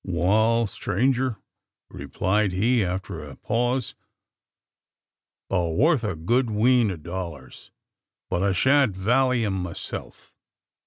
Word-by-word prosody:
"Wal, 110 +6 +2
stranger," 125 +5 -1 0.5
replied 100 0 -1
he, 115 +5 +2
after 90 -3 -4
a 70 -2 -10
pause, 120 +1 -1 1.5
"thur 85 -4 0
worth 140 - +3
a 105 -5 -2
good 120 +10 0
wheen 115 +1 +3
o' 95 - -4
dollars; 85 -4 -8 0.6
but 85 - -1
I 100 0 +2
shan't 130 +1 +3
valley 120 +4 +2
'em 100 - -1
myself. 90 +1 -8
105 Hz, 110 wpm, -24 LUFS, 90-120 Hz, 1.5 s, worth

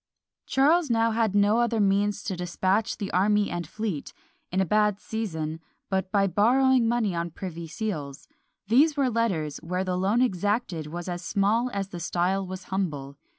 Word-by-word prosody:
Charles 300 +4 +3
now 230 -1 +2
had 220 -3 +1
no 205 +3 +4
other 235 -1 +1
means 200 0 +1
to 190 - -3
despatch 185 +4 0
the 200 - -4
army 205 +3 +2
and 175 -2 -4
fleet, 205 -5 -4 0.4
in 185 - 0
a 190 - +3
bad 210 +1 +2
season, 160 -10 -4 0.3
but 190 0 -1
by 200 -1 +3
borrowing 240 +6 +3
money 230 -4 +1
on 170 0 -2
privy 170 -1 -7
seals: 155 -7 -5 0.4
these 285 +8 +4
were 265 -3 +2
letters, 185 -11 -1
where 180 +3 -3
the 185 -1 -2
loan 195 +6 +1
exacted 205 -6 -1
was 175 +3 -6
as 175 -1 -4
small 210 +6 +1
as 195 -2 -3
the 175 - -7
style 180 +3 0
was 185 0 -7
humble. 145 -8 -2
195 Hz, 170 wpm, -26 LUFS, 175-225 Hz, 0.4 s, no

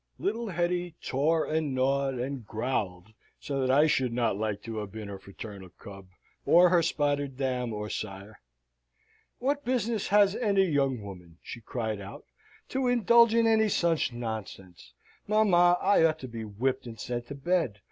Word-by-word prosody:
Little 235 - -2
Hetty 175 -1 -1
tore 155 +5 0
and 155 -3 -1
gnawed, 135 +1 +1
and 130 +1 -4
growled, 110 -4 -3 0.3
so 140 -2 -3
that 130 - 0
I 145 +4 +5
should 130 -5 +1
not 115 -3 0
like 105 -1 -3
to 115 -1 -6
have 105 -2 -5
been 105 -1 -7
her 100 -1 -7
fraternal 100 -1 -10
cub, 95 +1 -12 0.4
or 175 +1 +6
her 175 -1 +4
spotted 145 -4 -1
dam 125 -3 -1
or 105 0 -4
sire. 100 0 -7 1.0
"What 285 +3 -1
business 235 -4 -1
has 205 -1 +4
any 200 -5 +2
young 135 - 0
woman," 90 -4 -11
she 120 - -8
cried 110 -2 -4
out, 100 - -10 0.4
"to 265 -1 -1
indulge 235 -1 +5
in 230 0 +4
any 220 -1 +3
such 170 -7 +1
nonsense? 110 -6 -7 0.4
Mamma, 180 -5 +4
I 200 - +3
ought 160 -1 +3
to 130 - -6
be 115 -2 -7
whipped, 125 +5 -2
and 115 -2 -9
sent 120 +1 -4
to 140 - -7
bed. 140 - -1
135 Hz, 165 wpm, -28 LUFS, 110-175 Hz, 1.0 s, or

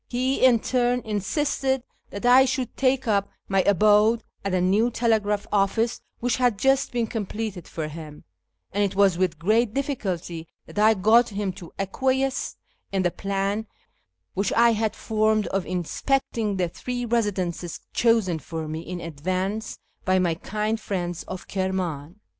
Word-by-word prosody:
He 255 +2 0
in 245 -4 +6
turn 245 -1 +1
insisted 265 - -1 0.3
that 200 - -6
I 255 +2 +7
should 260 -2 -2
take 265 -1 +1
up 200 -2 +2 0.2
my 195 -1 +3
abode 210 +3 +4 0.2
at 200 - -1
a 185 - +2
new 200 +6 +3
telegraph 215 -3 +1
office 210 +3 +1 0.2
wdiich 245 -2 +1
had 245 -5 +2
just 270 +5 +2
been 240 -1 0
completed 215 -3 -4
for 155 -2 -4
him, 155 -1 -9 0.5
and 205 +1 +1
it 195 -1 -1
was 195 -3 +4
with 180 -3 +1
great 215 +7 +2
difficulty 185 - -3 0.2
that - - -6
I 220 +1 +5
got 220 +5 +4
him 200 -2 -2
to 175 -2 -11
acquiesce 265 +7 0 0.4
in 190 -1 +1
the 175 - +2
plan 200 +3 -2 0.7
which 195 +1 0
1 235 0 +5
had 220 0 -1
formed 215 -1 +1
of 195 -1 -2
inspecting 210 - -1
the 180 -1 +1
three 245 +8 -4
residences 190 -7 -1
chosen 225 -8 +2
for 160 +2 -5
me 155 +1 -4
in 175 +2 -6
advance 185 +7 -3 0.3
by 185 -1 +2
my 180 -3 +2
kind 215 +5 -2
friends 175 -5 -3
of 185 -1 -7
Kirman. 185 -5 -2
205 Hz, 155 wpm, -25 LUFS, 185-235 Hz, 0.7 s, I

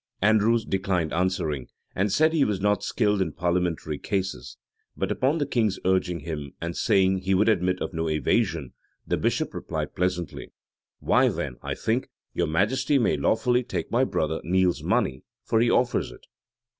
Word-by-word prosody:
Andrews 110 +2 +3
declined 95 -6 -1
answering, 85 -6 -1 0.3
and 100 +2 0
said 155 +9 +3
he 155 -4 +3
was 105 -5 0
not 105 +1 +1
skilled 105 -4 +1
in 80 -5 -1
parliamentary 85 -3 -1
cases: 95 - -3 0.4
but - - -1
upon 135 +5 +1
the 145 - 0
king's 115 -7 0
urging 90 -3 +1
him, 75 -3 -6
and 85 0 -4
saying 95 -3 +2
he 95 +1 0
would 105 +4 +3
admit 90 -4 +2
of - - -5
no 80 -1 -1
evasion, 80 - 0 0.3
the - - 0
bishop - - -1
replied - - -4
pleasantly, 90 -2 -3 0.5
"Why, - - +4
then, 60 - -4
I - - -4
think 115 +4 -1 0.2
your - - 0
majesty 105 - +1
may 120 - +2
lawfully 125 +2 +2
take 125 - -4
my 120 +3 +3
brother 80 - -1
Neile's 90 +1 +1
money; 65 0 0 0.2
for 110 - +1
he 120 +1 +3
offers 120 +1 +1
it." - - -15
95 Hz, 170 wpm, -25 LUFS, 85-110 Hz, 0.5 s, Why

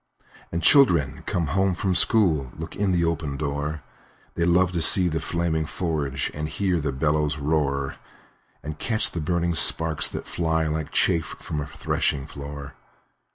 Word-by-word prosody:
And 85 0 -3
children 85 - +4
coming 85 -4 -1
home 95 +2 +1
from 95 +1 -1
school 80 - +2
Look 80 +1 -7
in 100 -2 0
at - - +1
the 85 -1 +2
open 80 -4 -2
door; 75 +1 -3 0.5
They 85 - 0
love 90 +1 +3
to 85 -2 -2
see 90 +3 +5
the 80 0 -2
flaming 80 -2 -1
forge, 70 -6 -2
And 75 +1 -4
hear 90 -1 0
the 75 -2 -2
bellows 75 +2 0
roar, 70 -2 -1 0.7
And 75 0 -7
catch 110 -2 +1
the 85 - -4
burning 85 +2 0
sparks 80 -2 +4
that - - -6
fly, 80 -1 -1
Like 80 -1 -3
chaff 80 -2 0
from 75 - -4
a 75 - -5
threshing 70 -1 -2
floor. 70 0 -8
80 Hz, 165 wpm, -24 LUFS, 75-85 Hz, 0.7 s, see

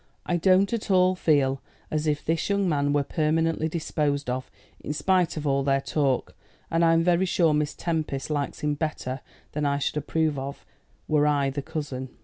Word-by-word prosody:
I 175 - 0
don't 190 +4 +3
at 225 -3 -3
all 185 -1 +4
feel 140 -6 +2 0.3
as 155 0 -1
if 150 -1 -1
this 165 +3 0
young 200 -1 +1
man 145 -3 +1
were 145 0 +2
permanently 160 +2 0
disposed 150 -4 -1
of, 130 +1 -4 0.3
in 150 - -4
spite 180 +1 +1
of 155 - -4
all 140 -1 +2
their 135 0 +2
talk; 135 -2 0 0.4
and 165 +1 +2
I'm 165 0 +4
very 180 +2 +3
sure 165 -3 +3
Miss 150 0 0
Tempest 155 -4 -2
likes 145 -2 -2
him 150 0 +1
better 140 -3 -3 0.3
than 150 - -3
I 140 -1 +1
should 140 +1 -2
approve 155 0 0
of 140 +1 -7 0.4
were 150 -1 +3
I 140 -2 +2
the 140 +1 -3
cousin." 135 -3 -5
150 Hz, 185 wpm, -26 LUFS, 140-165 Hz, 0.4 s, all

